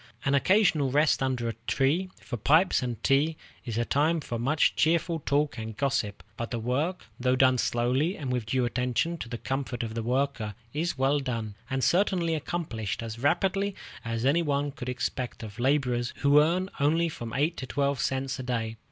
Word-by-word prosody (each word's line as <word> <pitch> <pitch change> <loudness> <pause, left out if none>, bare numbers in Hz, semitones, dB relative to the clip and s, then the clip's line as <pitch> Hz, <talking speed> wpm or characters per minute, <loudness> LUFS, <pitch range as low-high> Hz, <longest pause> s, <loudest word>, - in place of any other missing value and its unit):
An 140 - +2
occasional 155 - +3
rest 150 +3 +3
under 130 -3 0
a 115 - -1
tree, 155 +8 +1
for 130 - -6
pipes 155 - +3
and 120 -2 -3
tea, 150 +4 +2 0.3
is 115 -4 -4
the 120 +1 0
time 155 +6 +2
for 120 -6 -4
much 140 +6 +2
cheerful 165 +1 +2
talk 145 -3 0
and 110 -1 -6
gossip; 135 -7 -1
but 115 - -4
the 120 - -2
work, 140 +11 -1
though 125 +1 +2
done 130 -1 +4
slowly 130 +11 +1
and 135 -4 -4
with 125 -3 -2
due 125 +1 +1
attention 125 +7 -1
to 115 - -6
the 120 - -4
comfort 130 -1 -3
of 110 -1 -4
the 115 - -2
worker, 125 -3 -1 0.2
is 160 +1 -1
well 135 +2 +2
done, 115 -6 -3 0.2
and 130 -1 -1
certainly 180 -3 +2
accomplished 145 - -3
as 115 0 -6
rapidly 190 +8 +1 0.3
as 115 0 -2
any 150 +6 +4
one 145 -2 0
could 125 -1 -6
expect 125 -1 -3
of 110 +1 -9
laborers 125 -2 +1
who 145 +1 +6
earn 175 +5 +1
only 160 +4 +3
from 120 -7 -6
eight 150 +5 +1
to 130 - -5
twelve 140 0 0
cents 135 0 -1
a - - -4
day. 115 -3 -2
135 Hz, 190 wpm, -28 LUFS, 120-155 Hz, 0.3 s, who